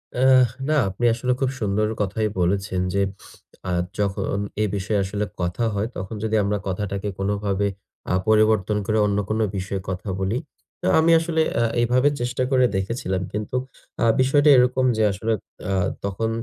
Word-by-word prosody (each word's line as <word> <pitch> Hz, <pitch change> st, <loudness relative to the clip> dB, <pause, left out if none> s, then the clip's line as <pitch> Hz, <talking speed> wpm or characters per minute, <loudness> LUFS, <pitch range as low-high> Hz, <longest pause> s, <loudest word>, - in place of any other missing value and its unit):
অ্যা 130 Hz, +2 st, +4 dB, 0.4 s
না 155 Hz, -, +3 dB
আপনি 100 Hz, +6 st, -3 dB
আসলে 125 Hz, +2 st, -1 dB
খুব 135 Hz, -2 st, +1 dB
সুন্দর 105 Hz, 0 st, +1 dB
কথাই 105 Hz, +2 st, 0 dB
বলেছেন 95 Hz, +1 st, 0 dB
যে, 100 Hz, -, +2 dB, 0.7 s
আ -, -, 0 dB, 0.3 s
যখন 100 Hz, 0 st, -1 dB, 0.2 s
এ -, -, +3 dB
বিষয়ে 100 Hz, +1 st, -1 dB
আসলে 105 Hz, +2 st, -2 dB, 0.2 s
কথা 90 Hz, +7 st, -1 dB
হয়, 100 Hz, +2 st, -1 dB
তখন 95 Hz, +4 st, -5 dB
যদি 110 Hz, 0 st, 0 dB
আমরা 105 Hz, +1 st, 0 dB
কথাটাকে 100 Hz, +1 st, -3 dB
কোনোভাবে 100 Hz, 0 st, 0 dB, 0.5 s
আ -, -, +3 dB
পরিবর্তন 110 Hz, -1 st, +3 dB
করে 110 Hz, +2 st, +1 dB
অন্য 100 Hz, 0 st, 0 dB
কোন 110 Hz, +1 st, 0 dB, 0.2 s
বিষয়ে 95 Hz, +1 st, -3 dB
কথা 95 Hz, +3 st, -4 dB
বলি। 95 Hz, +5 st, 0 dB, 0.4 s
তো -, -, -1 dB
আমি 165 Hz, +1 st, +4 dB
আসলে 160 Hz, -1 st, 0 dB, 0.2 s
আ -, -, +3 dB, 0.2 s
এভাবে 125 Hz, +4 st, +3 dB
চেষ্টা 125 Hz, +1 st, -1 dB
করে 130 Hz, -1 st, +4 dB
দেখেছিলাম। 95 Hz, -1 st, -2 dB
কিন্তু 105 Hz, +4 st, -4 dB, 0.5 s
আ -, -, +4 dB, 0.2 s
বিষয়টা 145 Hz, +3 st, +4 dB
এরকম 125 Hz, +1 st, +3 dB
যে, 110 Hz, -, +2 dB
আসলে 110 Hz, +4 st, -1 dB, 0.4 s
আ -, -, +1 dB, 0.3 s
তখন 100 Hz, +3 st, -1 dB
105 Hz, 165 wpm, -23 LUFS, 95-120 Hz, 0.7 s, অ্যা